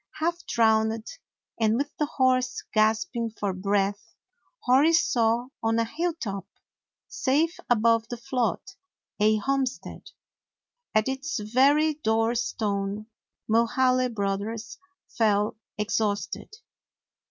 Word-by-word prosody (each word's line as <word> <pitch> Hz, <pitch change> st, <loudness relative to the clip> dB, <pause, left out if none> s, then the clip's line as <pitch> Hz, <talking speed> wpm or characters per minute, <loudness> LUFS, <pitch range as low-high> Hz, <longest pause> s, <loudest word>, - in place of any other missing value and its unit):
Half 340 Hz, +2 st, -2 dB
drowned, 220 Hz, -1 st, +2 dB, 0.5 s
and 220 Hz, -1 st, +3 dB
with 285 Hz, +2 st, -3 dB
the 300 Hz, -, 0 dB
horse 255 Hz, -3 st, +1 dB
gasping 220 Hz, +2 st, +1 dB
for 205 Hz, -3 st, -3 dB
breath, 200 Hz, +1 st, -1 dB, 0.5 s
Hori 275 Hz, +6 st, +4 dB
saw 240 Hz, -6 st, +2 dB
on 225 Hz, 0 st, +1 dB
a 230 Hz, -, +2 dB
hilltop, 230 Hz, -, -3 dB, 0.6 s
safe 310 Hz, +6 st, 0 dB
above 230 Hz, -1 st, +3 dB
the 240 Hz, -, -5 dB
flood, 250 Hz, -1 st, -1 dB, 0.6 s
a 215 Hz, +1 st, +4 dB
homestead. 270 Hz, +3 st, -3 dB, 0.9 s
At 215 Hz, +2 st, +3 dB
its 265 Hz, +4 st, -3 dB
very 275 Hz, +8 st, +3 dB
door 225 Hz, -5 st, +1 dB
stone 210 Hz, -2 st, -2 dB, 0.4 s
Mulhaly 255 Hz, +3 st, +3 dB
Brothers 205 Hz, +2 st, -3 dB, 0.3 s
fell 210 Hz, -2 st, +1 dB, 0.2 s
exhausted. 210 Hz, -1 st, -2 dB
230 Hz, 100 wpm, -26 LUFS, 215-260 Hz, 0.9 s, Hori